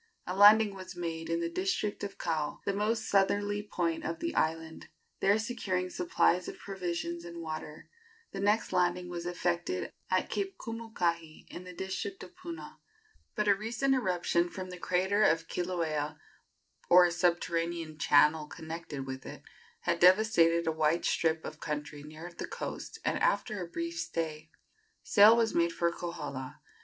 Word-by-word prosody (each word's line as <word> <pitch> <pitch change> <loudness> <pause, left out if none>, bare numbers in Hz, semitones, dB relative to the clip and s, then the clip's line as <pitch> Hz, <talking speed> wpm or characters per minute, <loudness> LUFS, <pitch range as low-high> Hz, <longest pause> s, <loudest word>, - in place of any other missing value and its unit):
A 180 - -3
landing 210 +1 +7
was 185 -1 -9
made 165 -2 -4
in 165 0 0
the 170 - 0
district 190 +4 -2
of 200 -1 -5
Kau, 155 -3 -2
the 200 - 0
most 215 +3 0
southerly 205 +1 +2
point 175 -5 -2
of 165 +1 -3
the 335 - -3
island. 160 0 -1 0.3
There 200 +2 +4
securing 195 -5 -2
supplies 180 0 +2
of - - -7
provisions 170 -3 -4
and 170 0 -8
water, 155 -1 -6 0.4
the - - -6
next 205 +1 +1
landing 180 0 +1
was 175 0 -5
effected 175 - -2 0.2
at 185 0 +1
Cape 390 -1 -2
Kumukahi, 175 -9 -3
in 180 - -8
the 180 - -9
district 190 - -4
of 350 - -13
Puna; 345 -2 -9 0.6
but 210 -1 0
a 200 - +7
recent 230 +7 0
eruption 180 -6 +1
from 185 +1 -7
the 180 - -8
crater 190 +4 +1
of 165 -4 +3
Kilauea, 155 -4 -2 0.7
or 180 0 +8
a 175 - +1
subterranean 170 -2 -1
channel 150 +2 +4
connected 160 -4 -7
with 130 0 -6
it, - - -9 0.4
had 170 - 0
devastated 175 -3 +5
a 160 - +2
wide 160 +1 +1
strip 160 -1 +1
of 155 - -7
country 150 -1 -4
near 155 +4 -9
the - - -6
coast, - - -6
and - - +1
after 210 -4 +1
a - - -7
brief 335 - -4
stay 155 - -3 0.5
sail 215 +2 +7
was 230 -1 +2
made 170 0 +2
for 170 0 0
Kohala. 150 -7 -6
175 Hz, 160 wpm, -31 LUFS, 165-200 Hz, 0.7 s, or